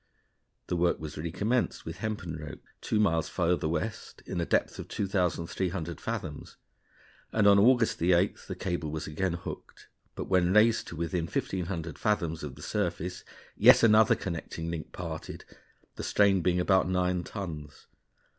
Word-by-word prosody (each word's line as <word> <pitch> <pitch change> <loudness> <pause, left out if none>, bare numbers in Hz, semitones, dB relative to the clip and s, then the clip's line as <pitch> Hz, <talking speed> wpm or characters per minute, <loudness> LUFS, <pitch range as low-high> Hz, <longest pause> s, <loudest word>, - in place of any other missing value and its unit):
The - - -2
work 85 0 +2
was 80 -2 -7
recommenced 100 +10 -1
with 80 +2 -6
hempen 95 -5 -4
ropes, 75 -2 -9
two 105 - 0
miles 80 -6 +2
farther 85 -3 0
west, 90 +7 -4
in 90 - -3
a 85 - -2
depth - - +1
of - - -6
2,300 90 -3 -2
fathoms, 75 -2 -5 0.7
and 105 -2 +2
on 100 0 +7
August 120 +1 +4
8th 90 +3 +2
the 95 - -4
cable 85 -5 -3
was 80 0 -4
again 85 +4 -1
hooked; 85 - -8 0.3
but - - -3
when 95 -1 +2
raised 110 +2 +4
to - - -7
within 85 +1 -2
1,500 85 -4 -3
fathoms 85 -7 0
of 75 -3 -6
the - - -11
surface, 90 +2 -2 0.3
yet - - +7
another 110 -1 +6
connecting 85 -1 -5
link 80 -2 -6
parted, 80 -3 -7 0.5
the - - -5
strain 100 -2 +3
being 90 +1 +2
about 95 0 +3
nine 90 -1 +1
tons. 80 -7 -7
90 Hz, 155 wpm, -29 LUFS, 80-100 Hz, 0.7 s, on